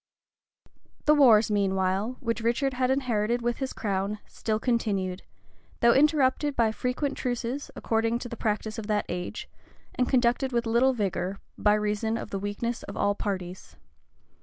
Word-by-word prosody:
[*] - - -36
The 300 - +6
wars, 235 -7 +6
meanwhile, 195 +3 0
which 230 -2 -2
Richard 250 +4 +1
had 255 0 0
inherited 240 -3 0
with 240 0 0
his 265 -1 -3
crown, 200 0 -2
still 215 -1 -2
continued; 200 -6 -1 0.6
though 235 0 +6
interrupted 290 0 +3
by 225 -2 +3
frequent 255 +5 -2
truces, 250 +2 -3
according 225 +1 0
to 240 - -6
the 235 - -6
practice 215 0 -2
of 210 - -7
that 210 -1 0
age, 180 0 -4 0.5
and 250 - 0
conducted 255 +1 +2
with 235 0 +1
little 240 +4 +3
vigor, 195 -3 -2 0.2
by 210 0 +3
reason 210 +2 -1
of 215 - -7
the 195 - -2
weakness 205 +4 -3
of - - -8
all 205 0 +2
parties. 185 -3 -5
230 Hz, 160 wpm, -27 LUFS, 205-250 Hz, 0.6 s, The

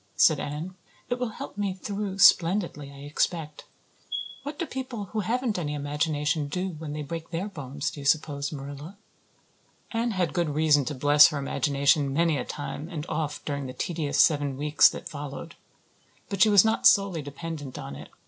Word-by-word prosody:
said - - +5
Anne. 150 +6 -5 0.4
"It 245 - -1
will 250 -2 -1
help 205 - -8
me 200 -2 -1
through 200 0 -4
splendidly, 170 -6 +4
I 140 0 -12
expect. 155 +1 -2 0.8
What 290 +1 -6
do 340 - -2
people 255 -6 -5
who 220 - 0
haven't 230 0 -1
any 150 -3 -3
imagination 150 +1 -1
do 180 +6 -2
when 155 -3 -7
they 150 0 -4
break 165 +2 -6
their 175 +4 -3
bones, 145 -6 -4
do - - -10
you 140 - -8
suppose, 145 -1 +1
Marilla?" 145 +5 -8 0.9
Anne 230 +1 0
had 185 -7 -1
good 175 -3 0
reason 150 -1 +3
to 150 - -3
bless 145 +3 +7
her 150 - -3
imagination 140 0 +1
many 165 +1 +2
a - - -2
time 145 +2 -6
and 160 -4 -5
oft 150 -2 -3
during 140 -2 -3
the 130 - -7
tedious 155 +2 -2
seven 145 -4 +3
weeks 150 +1 +5
that - - -7
followed. 145 +3 -7 0.8
But 200 -3 -3
she 220 - +7
was 205 -1 +7
not 220 0 +4
solely 195 -5 +4
dependent 145 -1 -7
on 70 +1 -7
it. - - -10
155 Hz, 180 wpm, -27 LUFS, 145-190 Hz, 0.9 s, bless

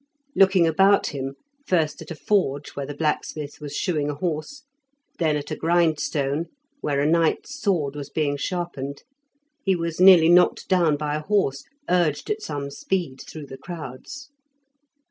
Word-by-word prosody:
Looking 190 -3 +5
about 195 +3 +3
him, 135 -1 -4 0.3
first 160 -4 +1
at - - -10
a 165 - -5
forge 150 -7 0
where 140 -1 -5
the 145 - -6
blacksmith 150 -1 -3
was 145 -1 -6
shoeing 150 -4 -1
a 145 - -3
horse, 165 - -4 0.6
then 155 -3 +2
at 145 - -7
a - - -1
grindstone, 160 -2 +1 0.3
where 140 - 0
a - - +1
knight's 165 - +1
sword 165 -10 0
was 145 -1 -6
being 145 -1 0
sharpened, 140 -3 -4 0.6
he 190 -1 +2
was 170 -1 -3
nearly 185 -4 +8
knocked 180 +1 +4
down 170 -5 +3
by 150 0 -2
a 150 - -1
horse, 150 -9 0 0.2
urged 175 - +1
at 425 0 -2
some 140 - -5
speed 150 -3 -3
through 155 -2 -8
the 135 -1 -10
crowds. 175 - -8
155 Hz, 160 wpm, -24 LUFS, 145-180 Hz, 0.6 s, nearly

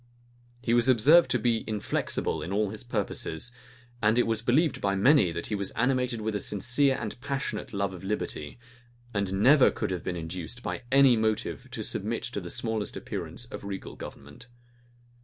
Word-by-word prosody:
He 115 - +1
was 120 +2 +4
observed 140 +8 +6
to - - +2
be 115 0 +1
inflexible 105 -7 -1
in 80 +4 -5
all 105 0 0
his 110 - -7
purposes; 110 -3 -3 0.5
and 110 +1 +3
it 120 - +4
was 115 -1 -1
believed 140 +7 +2
by 100 -1 +1
many 105 - +5
that 85 0 -4
he - - -4
was 100 -2 -1
animated 125 -1 +1
with 110 0 -2
a 105 - -1
sincere 125 +8 +2
and 115 +2 -6
passionate 135 -6 -3
love 100 -2 -1
of 90 0 -10
liberty, 95 -7 -3 0.6
and 100 -2 -1
never 140 +2 +7
could - - -3
have 90 -2 -3
been 90 - -3
induced 90 +8 -6
by - - -3
any 135 -2 +6
motive 110 -1 -1
to - - -5
submit - - -2
to - - -3
the - - -7
smallest 110 -3 -2
appearance 120 - -5
of 120 - -9
regal 100 -1 -6
government. 70 - -11
110 Hz, 180 wpm, -28 LUFS, 100-125 Hz, 0.6 s, never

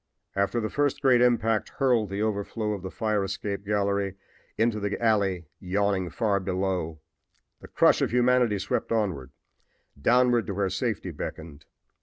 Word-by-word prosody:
After 100 +4 +1
the 110 -1 -3
first 145 -2 0
great 130 -4 +4
impact 115 -3 +2
had - - -24
hurled 125 -7 +2
the 100 +2 -2
overflow 105 +1 -2
of 100 - -5
the 95 - -5
fire 105 0 -1
escape 100 +1 -4
gallery 100 -1 0 0.4
into 110 -1 +1
the 100 0 -2
alley 100 -6 +1
yawning 95 -1 0
far 100 +2 0
below, 90 -4 -2 0.6
the - - -12
crush - - +3
of - - +2
humanity 125 -2 +3
swept 95 - -2
onward, 95 - -1 0.7
downward 120 - +3
to 100 - -3
where 95 -1 0
safety 95 -2 -2
beckoned. 80 0 -7
100 Hz, 155 wpm, -26 LUFS, 95-115 Hz, 0.7 s, great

